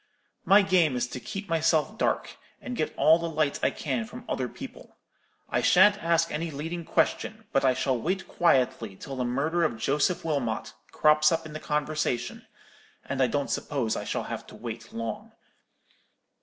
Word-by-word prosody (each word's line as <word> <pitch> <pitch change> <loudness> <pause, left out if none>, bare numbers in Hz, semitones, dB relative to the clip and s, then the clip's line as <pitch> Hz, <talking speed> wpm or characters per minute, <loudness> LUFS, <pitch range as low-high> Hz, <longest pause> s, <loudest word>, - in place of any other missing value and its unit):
My 200 +1 +7
game 180 -8 +3
is 125 - 0
to 125 - -6
keep 195 +9 -6
myself 165 +3 +1
dark, - - -1 0.2
and 250 - -6
get 155 - -1
all 160 +2 +6
the 170 0 -3
light 155 -3 0
I - - +3
can 130 -6 -2
from - - -10
other - - -1
people. - - -11 0.5
I - - 0
shan't 210 -2 +5
ask 165 0 +2
any 165 +2 -2
leading 165 +4 -5
question, 220 +6 0
but 135 - +2
I 130 -1 +4
shall 130 -2 0
wait 190 +6 -2
quietly 130 - +1
till 135 +7 -8
the 130 - -1
murder 150 +8 0
of 120 -8 0
Joseph 145 +10 0
Wilmot 140 -8 -2 0.2
crops 150 +1 +4
up 165 0 0
in 155 - -9
the 155 - -5
conversation; 150 -5 -2 0.6
and 135 -1 -2
I 130 - +5
don't 140 +3 -1
suppose 130 -7 -1
I - - -3
shall - - -2
have - - -6
to - - -12
wait 115 -1 -7
long. 115 -1 -5
150 Hz, 180 wpm, -27 LUFS, 130-165 Hz, 0.6 s, My